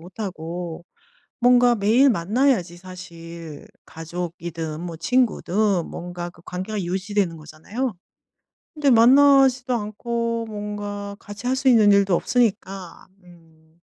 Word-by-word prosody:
못하고 175 -2 -6 0.6
뭔가 245 -1 +5
매일 230 +7 +4
만나야지 205 -2 +1
사실 170 -4 -10 0.2
가족이든 165 -1 -6
뭐 170 -1 -6
친구든 205 -2 +1
뭔가 175 0 -6
그 170 - -19
관계가 190 +3 -4
유지되는 190 0 -1
거잖아요. 160 - -5 0.8
근데 295 -3 +2
만나지도 260 +1 +5
않고 230 +1 -3
뭔가 205 -1 -6
같이 205 +4 -9
할 260 +1 +1
수 265 0 +1
있는 220 -5 +6
일도 200 -2 +3
없으니까. 195 -5 -1 0.2
음. 165 -2 -21
200 Hz, 250 characters per minute, -22 LUFS, 170-235 Hz, 0.8 s, 있는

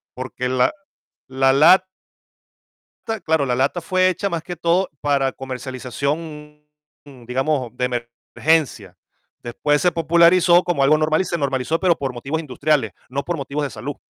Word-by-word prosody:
porque 125 0 -4
la 130 -1 +2 0.6
la 135 0 +3
lat 165 +7 +6 1.2
ta, 225 -1 -2
claro, 160 -4 0
la 125 -1 0
lata 140 +7 0
fue 185 +2 +2
hecha 195 +3 -2
más 165 -2 -3
que 175 0 -6
todo 170 +3 +1
para 140 -2 +1
comercialización, 140 +4 -5 0.6
digamos, 130 -1 -2
de 125 - -1 0.5
emergencia. 140 - 0 0.5
Después 145 +5 0
se 180 -1 +3
popularizó 170 +2 +4
como 160 -6 0
algo 155 +3 +4
normal 155 +2 +1
y - - -3
se 170 - -2
normalizó, 140 +2 -1
pero 180 -3 +3
por 135 -2 -4
motivos 135 +6 -4
industriales, 145 -5 0 0.2
no 140 +2 -3
por 175 -2 -3
motivos 140 +2 -4
de 140 - -2
salud. 145 +1 -6
150 Hz, 155 wpm, -20 LUFS, 130-170 Hz, 1.2 s, lat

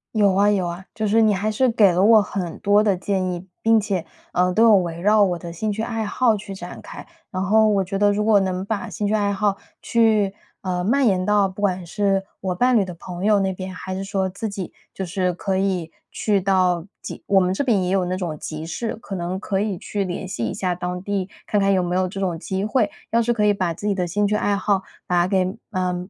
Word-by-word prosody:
有 205 -3 +4
啊 200 +2 +4
有 195 -3 +1
啊， 175 +2 -6
就 220 - -2
是 225 +2 +4
你 215 -1 +4
还 205 +3 -1
是 255 +5 +2
给 215 -5 +5
了 175 +1 +1
我 220 +2 +7
很 185 -4 -4
多 205 +1 +4
的 205 -3 +2
建 185 0 -1
议， 175 +1 -7 0.2
并 225 -1 +4
且， 195 -4 -2 0.3
呃， 180 0 +2
都 220 - +4
有 225 -2 +7
围 170 -2 -2
绕 210 +3 +4
我 180 -3 +1
的 170 0 -8
兴 205 +5 -2
趣 220 - -3
爱 225 -1 -2
好 225 0 +2
去 200 -1 -8
展 175 -1 -9
开。 - - -10 0.3
然 185 0 -2
后 215 +3 +4
我 200 -2 +2
觉 195 +2 -4
得， 205 0 +4
如 210 +1 0
果 215 -2 +5
能 190 -1 -2
把 205 -1 -3
兴 205 -1 -2
趣 - - 0
爱 205 -1 +1
好 200 0 0 0.2
去， 220 -4 +2 0.3
呃， 180 -1 -2
蔓 270 +6 +3
延 185 -4 +2
到 205 -1 +3
不 190 - -12
管 185 -3 0
是 195 +2 0 0.2
我 185 -2 -2
伴 250 +5 +3
侣 200 - +2
的 180 - -7
朋 175 +2 -7
友 210 -1 +4
那 190 0 0
边， 185 0 -6
还 185 +1 -6
是 190 +1 -4
说 195 -1 -1
自 200 +4 -5
己 195 -4 -5 0.2
就 190 - -4
是 180 0 -1
可 190 +2 -2
以 185 -4 -1 0.2
去 205 -2 +1
到 185 -3 +1 0.2
集 - - -8
我 200 - +3
们 180 0 +1
这 195 - -2
边 215 -7 +2
也 180 - -1
有 190 -1 +1
那 180 +1 -2
种 170 -5 -4
集 155 0 -6
市， 220 +7 -4
可 210 -3 -8
能 175 +2 -3
可 195 0 -2
以 205 -2 -1
去 200 +3 -3
联 180 +1 -4
系 150 -11 -3
一 - - -3
下 180 -2 -1
当 180 +1 -4
地， 195 -2 -2 0.2
看 210 - +1
看 195 0 +3
有 185 - +2
没 175 0 -2
有 185 0 +1
这 195 +2 -6
种 175 -4 -1
机 190 +3 -3
会。 215 0 +1 0.2
要 230 - +3
是 240 +1 +1
可 215 -2 0
以 205 - +4
把 185 -4 -1
自 205 - -9
己 210 - +2
的 180 -2 -1
兴 205 +4 0
趣 205 - 0
爱 205 - +1
好 200 -1 0 0.2
把 175 0 +2
给 190 +1 0
嗯， 180 -1 -2
195 Hz, 275 characters per minute, -22 LUFS, 180-210 Hz, 0.3 s, 我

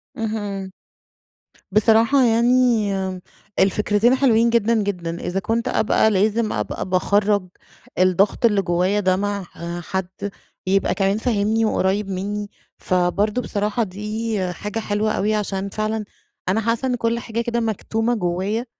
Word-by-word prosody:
اهم. 205 -4 -4 1.0
بصراحة 225 +6 +4
يعني 235 -2 +3 0.7
الفكرتين 210 +5 +3
حلوين 235 -4 +3
جدًا 230 0 +2
جدًا، 175 -4 -3
إذا 185 +2 -2
كنت 225 +5 -1
أبقى 220 0 +2
لازم 215 +3 +1
أبقى - - -3
باخرَّج 200 +1 +2 0.5
الضغط 185 +5 +3
اللي 205 -3 +4
جوايا 180 +3 +1
ده 185 -2 +2
مع 200 0 -2 0.4
حد 190 +2 -4 0.4
يبقى 195 +1 +2
كمان 195 +1 +1
فاهمني 220 -1 +1
وقريب 200 -1 0
منّي، 205 +2 -3 0.3
فبرضه 190 +6 0
بصراحة 210 +1 -1
دي 210 +3 -3 0.2
حاجة 210 +4 -4
حلوة 215 0 -1
أوي 215 +2 0
عشان 200 -1 -2
فعلًا 215 +1 -2 0.4
أنا 220 +4 +2
حاسة 230 +3 0
إن 250 - +1
كل 230 0 0
حاجة 230 0 -3
كده 235 0 -1
مكتومة 225 +1 -1
جوايا 195 +4 -1
210 Hz, 130 wpm, -21 LUFS, 195-225 Hz, 1.0 s, بصراحة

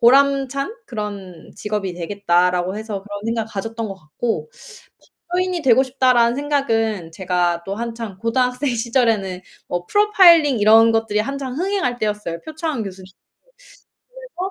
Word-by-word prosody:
보람찬 275 - +3
그런 200 -7 -7
직업이 210 -3 -3
되겠다.'라고 180 0 0
해서 215 -2 -5
그런 205 0 -7
생각을 230 -1 -2
가졌던 225 +2 -4
것 195 - -6
같고 190 - -4 0.8
'법조인이 360 -1 -1
되고 260 0 +5
싶다.'라는 250 -2 +3
생각은 225 - -1
제가 175 -1 0
또 195 - -3
한창 230 -4 -5
고등학생 250 +5 0
시절에는 225 -6 0 0.3
뭐 175 0 -3
프로파일링 345 - +5
이런 225 +2 +6
것들이 225 -2 +1
한창 270 +2 -4
흥행할 365 -10 -1
때였어요, 210 -6 -3
표창원 315 -5 -4
교수님. 190 -1 -9 1.1
그래서 390 -7 -6
225 Hz, 335 characters per minute, -20 LUFS, 195-275 Hz, 1.1 s, 이런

